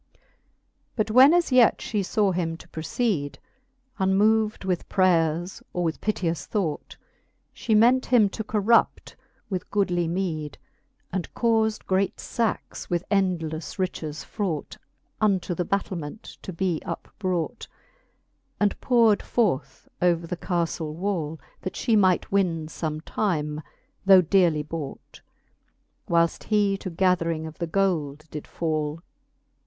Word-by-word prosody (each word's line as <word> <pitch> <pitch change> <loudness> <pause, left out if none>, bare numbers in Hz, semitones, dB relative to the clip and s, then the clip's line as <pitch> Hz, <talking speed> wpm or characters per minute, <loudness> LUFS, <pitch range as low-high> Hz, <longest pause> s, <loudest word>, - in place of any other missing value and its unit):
XXIII. - - -37 0.7
But 215 -2 0
when 260 +5 +8
as 345 -3 +2
yet 250 -3 +6
fhe 210 -2 -2
faw 200 +1 +1
him 165 -2 -2
to - - -15
proceede, 160 -2 -2 0.6
Unmov'd 210 +2 +2
with 180 -2 -2
praiers, 175 -2 +1
or 180 - -1
with 160 -2 -2
piteous 170 -8 -1
thought, 180 -8 -3 0.6
She 220 - 0
ment 245 +4 +4
him 235 -5 +5
to 220 - -5
corrupt 215 +2 +2 0.3
with 185 -3 -4
goodly 180 -4 +1
meede; 165 -4 -3 0.6
And 185 -2 -3
caufde, 220 -2 +1
great 190 +2 0
fackes 230 -2 -3
with 175 +1 -1
endlefle 175 -5 -1
riches 160 -5 -3
fraught. 185 -9 -3 0.5
Unto 195 -4 +1
the 180 - -1
battilment 185 -2 -3 0.2
to - - -6
be 175 -2 -1
upbrought. 185 -4 -4 0.9
And 205 -1 +1
powred 230 -4 +4
forth 200 - -1
upon 175 -2 +3
the 170 +2 -4
caflle 170 -4 -2
wall, 165 -4 -2 0.2
That 185 - -4
fhe 230 -3 +1
might 185 -4 +3
win 175 -5 +1
fbm*e 155 -1 -4
time, 150 -7 -1 0.5
though 190 -1 +9
dearly 170 -3 +3
bought, 150 -2 -7 0.9
Whileft 170 0 +2
he 205 -2 +2
to 185 - -5
gathering 170 -2 +1
of 160 0 -9
the 170 - -2
gold 160 -5 0
did 150 - -7
fall. 155 -1 -2
185 Hz, 130 wpm, -25 LUFS, 165-205 Hz, 0.9 s, though